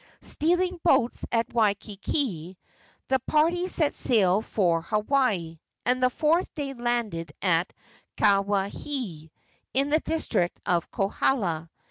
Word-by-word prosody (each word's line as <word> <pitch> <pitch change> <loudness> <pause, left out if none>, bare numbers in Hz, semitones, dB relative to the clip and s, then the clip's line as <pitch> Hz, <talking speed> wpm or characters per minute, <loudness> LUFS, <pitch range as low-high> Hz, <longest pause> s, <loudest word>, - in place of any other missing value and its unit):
Stealing 355 +3 +1
boats 250 -8 +2
at 230 -1 0
Waikiki, 205 - -1 0.5
the 265 - +2
party 330 +7 +1
set 310 -5 +1
sail 205 -4 +3
for 175 -7 +1
Hawaii, 210 - 0 0.3
and 255 +1 +1
the 255 - +4
fourth 320 +7 +1
day 280 -2 -3
landed 235 - -2
at 175 -1 +2 0.5
Kawaihae, 200 - 0 0.5
in 275 +2 +1
the 310 - +4
district 315 - 0
of 175 -2 0
Kohala. 195 -5 -1
225 Hz, 110 wpm, -26 LUFS, 180-280 Hz, 0.5 s, the